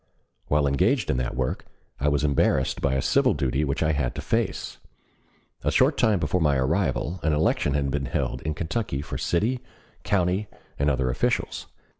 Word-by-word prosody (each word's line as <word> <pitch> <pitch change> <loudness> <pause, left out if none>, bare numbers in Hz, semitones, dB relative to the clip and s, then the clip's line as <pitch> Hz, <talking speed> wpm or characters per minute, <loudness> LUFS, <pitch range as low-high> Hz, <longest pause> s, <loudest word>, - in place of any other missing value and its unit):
While 75 0 +2
engaged 70 -1 +2
in - - 0
that 60 -1 -2
work, 65 0 -2 0.4
I 70 - 0
was 75 -1 +2
embarrassed 70 -3 +1
by 70 -1 +1
a 65 - 0
civil - - +3
duty 70 0 0
which 70 +1 -1
I 80 - +2
had 65 -5 -1
to - - -4
face. - - -2 0.8
A - - +1
short - - +3
time 110 -3 +3
before 85 +2 0
my 75 -3 +3
arrival 85 +4 0
an 80 - +1
election 75 -1 +1
had 70 -1 0
been 70 0 -1
held 65 - -2
in 80 0 -3
Kentucky 85 -4 -2
for - - -5
city, 110 +9 0 0.4
county, 95 +1 +1 0.3
and 70 +1 +2
other 65 -2 +1
officials. - - -1
75 Hz, 180 wpm, -25 LUFS, 70-85 Hz, 0.8 s, civil